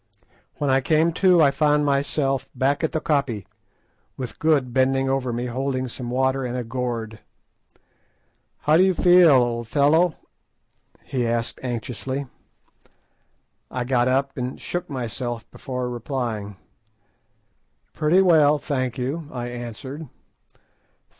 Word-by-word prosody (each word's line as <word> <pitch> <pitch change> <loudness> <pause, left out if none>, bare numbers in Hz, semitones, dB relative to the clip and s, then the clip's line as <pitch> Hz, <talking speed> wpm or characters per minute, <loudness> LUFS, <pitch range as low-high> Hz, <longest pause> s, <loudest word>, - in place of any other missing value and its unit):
When 145 -2 0
I 135 +1 +3
came 160 +4 +2
to 180 -4 +6
I 140 - +5
found 150 0 +2
myself 140 -1 0
back 140 +4 +1
at 160 - +1
the 160 - -1
koppie, 140 - -1 0.7
with 125 -3 -6
Good 145 -6 +2
bending 135 +1 +2
over 135 -2 0
me 120 +1 -3
holding 130 +1 -2
some 120 0 -7
water 130 +1 +1
in 125 -1 -3
a 125 - -2
gourd. 115 -2 -4 1.4
"How 155 +2 +4
do 180 - +6
you 190 -1 +3
feel, 180 -1 +6
old 120 -4 +2
fellow?" 155 +6 +3 0.9
he 125 -4 -2
asked 115 0 -2
anxiously. 130 +3 -4 1.4
I 125 - -3
got 125 -1 +1
up 135 +1 0
and 125 +1 -4
shook 175 0 -4
myself 120 -2 -4
before 125 -1 -4
replying. 120 -4 -4 1.4
"Pretty 165 +5 +3
well, 155 -5 +5
thank 130 -4 -2
you," 145 +5 -3
I 120 -1 -4
answered. 120 +5 -7
130 Hz, 125 wpm, -23 LUFS, 120-150 Hz, 1.4 s, to